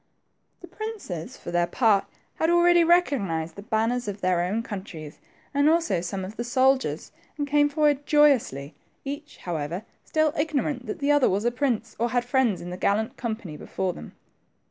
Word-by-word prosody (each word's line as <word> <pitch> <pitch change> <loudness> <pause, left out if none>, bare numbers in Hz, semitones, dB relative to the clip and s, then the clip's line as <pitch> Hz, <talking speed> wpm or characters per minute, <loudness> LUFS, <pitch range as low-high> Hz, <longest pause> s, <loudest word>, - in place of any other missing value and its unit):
The 355 - -10
princes, 375 - -6
for - - -8
their 175 0 +2
part, 210 +1 +3 0.3
had 320 - +1
already 345 0 +5
recognized 215 - +1
the 200 - -8
banners 225 +2 0
of 205 0 -4
their 180 -1 +2
own 200 +6 -1
countries, 185 -8 -8 0.3
and 285 +2 +4
also 325 - +2
some 185 +2 -4
of 205 +4 -9
the 235 - -2
soldiers, 260 +2 +1 0.3
and 290 -1 -2
.came 290 0 +3
forward 290 -1 +1
joyously, 255 - +3 0.3
each, 285 +2 -6
however, 170 +2 -3 0.2
still 310 -1 +1
ignorant 290 -4 -1
that - - -4
the 285 0 +1
other 290 -2 +4
was 200 +4 0
a 240 - +3
prince, 240 -3 -1
or 235 +1 +1
had 245 0 0
friends 245 -6 +1
in 175 - -7
the 180 - -5
gallant 210 +4 0
company 220 -9 -5
before 185 +4 -3
them. 75 - -10
240 Hz, 175 wpm, -25 LUFS, 185-290 Hz, 0.3 s, already